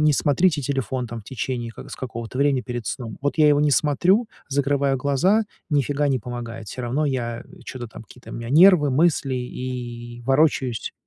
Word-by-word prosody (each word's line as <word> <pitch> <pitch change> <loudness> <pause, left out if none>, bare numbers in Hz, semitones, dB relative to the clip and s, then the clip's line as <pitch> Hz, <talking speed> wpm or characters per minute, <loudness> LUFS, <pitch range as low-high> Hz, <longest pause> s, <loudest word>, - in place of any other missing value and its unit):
н - - +3
не 150 - +5
смотрите 150 +2 +2
телефон, 130 -2 -2
там, 115 0 -7
в - - -19
течение 120 0 -4
ка - - -10
с - - -7
какого-то 115 0 -6
времени 140 -2 +2
перед 120 -3 -5
сном. 115 0 -5
Вот, 145 +3 -1
я 150 -1 +6
его 145 0 +4
не 150 0 +3
смотрю, 180 - +3 0.2
закрываю 140 0 +1
глаза- 150 - +2 0.3
ни 145 -1 +3
фига 145 +2 0
не 135 -2 +1
помогает, 120 -1 -7
всё 125 - -6
равно 135 +6 0
я, 120 -3 -2
м, - - -17
чё-то, 125 -2 -6
там, 115 - -11
какие-то 120 +3 -14
у - - -7
меня 115 0 -6
нервы, 160 -1 +6
мысли, 140 -2 +2
и 120 -1 -6
ворочаюсь. 135 -4 +1
135 Hz, 200 wpm, -23 LUFS, 120-145 Hz, 0.3 s, я